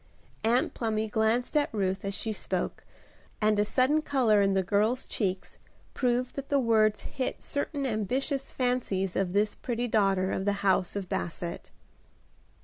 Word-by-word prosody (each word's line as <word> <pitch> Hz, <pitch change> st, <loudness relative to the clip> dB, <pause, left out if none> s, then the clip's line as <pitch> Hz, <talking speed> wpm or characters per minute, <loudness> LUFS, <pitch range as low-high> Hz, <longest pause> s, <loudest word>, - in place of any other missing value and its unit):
Aunt 235 Hz, +3 st, +2 dB
Plumy 220 Hz, -2 st, -1 dB
glanced 220 Hz, +5 st, +1 dB
at 300 Hz, +1 st, +2 dB
Ruth 190 Hz, -2 st, -1 dB
as 200 Hz, 0 st, -3 dB
she 220 Hz, +1 st, -2 dB
spoke, -, -, -3 dB, 0.6 s
and 215 Hz, -1 st, +2 dB
a -, -, +5 dB
sudden 260 Hz, +8 st, +2 dB
color 245 Hz, -8 st, +3 dB
in 195 Hz, -1 st, +2 dB
the 190 Hz, -, +2 dB
girl's 210 Hz, +7 st, +1 dB
cheeks 190 Hz, -4 st, -3 dB, 0.3 s
proved 250 Hz, -1 st, 0 dB
that 275 Hz, 0 st, -6 dB
the 285 Hz, -, +3 dB
words 220 Hz, -4 st, +3 dB
hit 260 Hz, -2 st, -4 dB
certain 285 Hz, 0 st, -3 dB
ambitious 260 Hz, +5 st, -1 dB
fancies 235 Hz, -8 st, -1 dB
of 190 Hz, -2 st, 0 dB
this 205 Hz, +2 st, +2 dB
pretty 240 Hz, 0 st, -3 dB
daughter 195 Hz, -4 st, +2 dB
of 190 Hz, -, -2 dB
the 205 Hz, -, +2 dB
house 190 Hz, -1 st, +2 dB
of 200 Hz, -2 st, -3 dB
Basset. 170 Hz, 0 st, -4 dB
220 Hz, 155 wpm, -28 LUFS, 195-250 Hz, 0.6 s, a